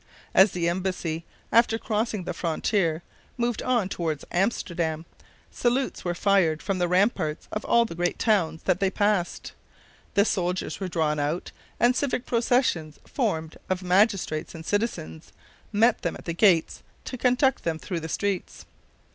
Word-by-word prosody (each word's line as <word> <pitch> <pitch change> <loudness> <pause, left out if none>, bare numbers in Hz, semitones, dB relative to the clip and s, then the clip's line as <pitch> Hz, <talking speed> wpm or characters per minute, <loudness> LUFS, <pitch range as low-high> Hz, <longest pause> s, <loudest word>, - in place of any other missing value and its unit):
As 190 +1 +6
the 170 -1 0
embassy, 170 -2 -2 0.3
after 230 -1 +4
crossing 220 -3 -2
the - - -4
frontier, 170 0 0 0.3
moved 240 -1 -1
on 240 -6 +1
toward 160 -5 -3
Amsterdam, 170 -5 -1 0.5
salutes 250 +2 0
were 175 -1 -1
fired 175 -5 +2
from 195 -2 -1
the 175 - +2
ramparts 180 -4 +1
of 215 - -3
all 235 0 +4
the 195 - -6
great 175 +1 -1
towns 185 -8 +1
that 185 -1 +1
they 195 - +2
passed, 205 -3 0 0.6
the 200 - +5
soldiers 180 -3 -1
were 190 - -3
drawn 155 -4 0
out, 150 +5 -2 0.3
and 245 +1 +4
civic 260 -2 -1
processions, 230 - +1
formed 160 - -2
of 185 0 -1
magistrates 185 -4 +1
and 160 -1 -9
citizens, 205 - -3 0.4
met 225 +3 +3
them 170 - -2
at - - -14
the 170 - -2
gates 170 -3 +3 0.2
to - - -5
conduct 250 +2 +2
them 165 -1 -1
through 175 +1 -4
the 160 0 -6
streets. 200 +1 -3
185 Hz, 155 wpm, -26 LUFS, 165-220 Hz, 0.6 s, As